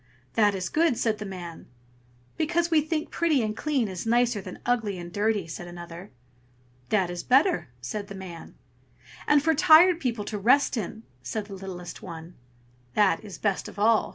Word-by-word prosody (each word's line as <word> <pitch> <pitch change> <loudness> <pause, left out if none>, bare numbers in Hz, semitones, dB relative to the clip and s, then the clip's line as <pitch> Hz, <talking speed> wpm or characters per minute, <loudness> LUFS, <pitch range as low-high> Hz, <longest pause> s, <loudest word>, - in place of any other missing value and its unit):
"That 210 -3 +3
is 185 -2 -3
good!" 315 - +2
said 220 -2 0
the 210 - -5
man. 175 -3 -8 0.7
"Because 335 +2 0
we 315 -2 +5
think 310 0 -3
pretty 315 -7 +2
and 215 0 -2
clean 275 -4 0
is 185 -2 -5
nicer 240 -2 +2
than - - -8
ugly 225 -5 0
and 175 -1 -8
dirty!" 205 -2 +1
said 170 +2 -7
another. 175 +1 -9 0.8
"That 190 -4 +1
is 175 0 -4
better!" 280 - +3
said 200 +12 -5
the 200 - -8
man. 180 -3 -9 0.7
"And 295 -1 +4
for 320 +1 +3
tired 320 +3 +7
people 235 -8 -2
to 210 - -4
rest 265 +7 +4
in!" 220 0 -5 0.2
said 140 +12 -4
the 205 - -10
littlest 185 -2 -8
one. 165 -1 -9 0.6
"That 205 -3 +3
is 200 -6 -9
best 200 +1 -1
of - - -11
all!" 215 +1 +3
210 Hz, 180 wpm, -26 LUFS, 185-265 Hz, 0.8 s, tired